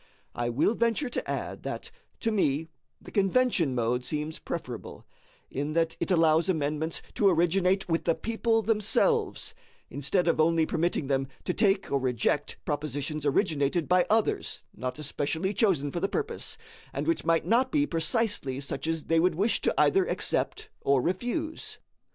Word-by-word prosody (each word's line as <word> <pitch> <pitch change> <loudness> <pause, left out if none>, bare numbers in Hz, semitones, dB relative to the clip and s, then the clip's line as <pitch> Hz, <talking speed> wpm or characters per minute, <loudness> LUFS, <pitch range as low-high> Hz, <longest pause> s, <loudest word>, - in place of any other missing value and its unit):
I 120 0 -2
will 135 - +2
venture 235 +4 0
to - - -4
add - - -3
that 460 - -5 0.3
to 225 - +1
me 160 -6 +1 0.3
the - - -13
convention 195 - +2
mode 120 +1 0
seems 150 +4 -4
preferable, 125 -9 -6 0.5
in 145 +3 -2
that 165 0 +1
it - - -2
allows 165 -1 +4
amendments 155 -1 -1
to 200 - +4
originate 185 +2 +2
with 165 -1 0
the 165 - +3
people 225 0 0
themselves, 225 - +1 0.4
instead 160 +6 0
of 170 - +2
only 165 0 +4
permitting 165 -2 0
them 135 0 0 0.2
to 180 - -1
take 200 -1 +2
or 140 - +2
reject 130 +3 0
propositions 150 0 -2
originated 150 0 +1
by 180 0 +3
others 220 +1 +1
not 125 +1 -4
especially 155 +5 -1
chosen 170 - +2
for 170 - -2
the 195 +3 0
purpose, 445 - -3 0.3
and - - -3
which 330 0 0
might 165 0 +2
not 255 +3 +3
be 295 -1 +3
precisely 165 - 0
such 140 +1 -4
as 165 -1 -1
they 165 0 +2
would 175 -1 +3
wish 205 +7 +2
to - - +2
either 385 -1 +4
accept 435 0 -1
or 140 -1 +3
refuse. 245 - -3
165 Hz, 160 wpm, -28 LUFS, 145-210 Hz, 0.5 s, allows